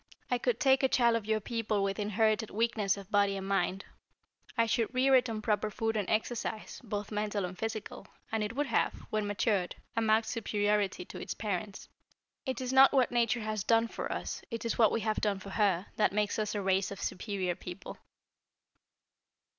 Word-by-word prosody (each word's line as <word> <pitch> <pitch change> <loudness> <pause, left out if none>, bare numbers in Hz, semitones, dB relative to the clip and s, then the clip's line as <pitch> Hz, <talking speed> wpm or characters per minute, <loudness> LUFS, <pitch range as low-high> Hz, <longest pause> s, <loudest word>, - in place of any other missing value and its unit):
"I 250 - +2
could 240 -1 0
take 270 -2 +4
a 265 - +4
child 235 -3 +3
of 220 -2 -2
your 220 0 +2
people 215 -2 -1
with 195 +1 -1
inherited 215 +1 +1
weakness 215 -2 +1
of 200 +1 -10
body 200 -1 +3
and 195 0 -5
mind. 195 -1 0 0.7
I 230 - +4
should 225 0 0
rear 265 +1 +4
it 250 -2 +5
on 215 -1 -4
proper 215 -1 +1
food 225 +2 -2
and 205 -3 -1
exercise 220 0 -2
both 205 -2 -4
mental 210 -2 -1
and 180 +1 -6
physical 220 +1 -5 0.2
and 220 -1 0
it 210 +3 -4
would 290 +2 +1
have, 240 - +1 0.2
when 215 -1 0
matured, 205 -3 0 0.2
a 230 - +2
marked 220 0 +3
superiority 205 -4 0
to - - -9
its - - -4
parents. 205 -1 -4 0.6
It 260 - -2
is 255 0 -2
not 265 0 +8
what 260 -3 +3
Nature 235 -1 +2
has 215 -2 -2
done 230 +1 +3
for - - -5
us, - - -4
it 230 -1 -5
is 230 - 0
what 220 -3 +5
we 230 - 0
have 215 0 0
done 205 -2 +1
for 195 +1 -9
her, 195 -3 +2
that 210 - +3
makes 210 +1 0
us 210 0 -1
a 205 - -1
race 190 0 +2
of 200 - -7
superior 185 -2 -2
people." 180 +1 -9
215 Hz, 200 wpm, -31 LUFS, 200-230 Hz, 0.7 s, not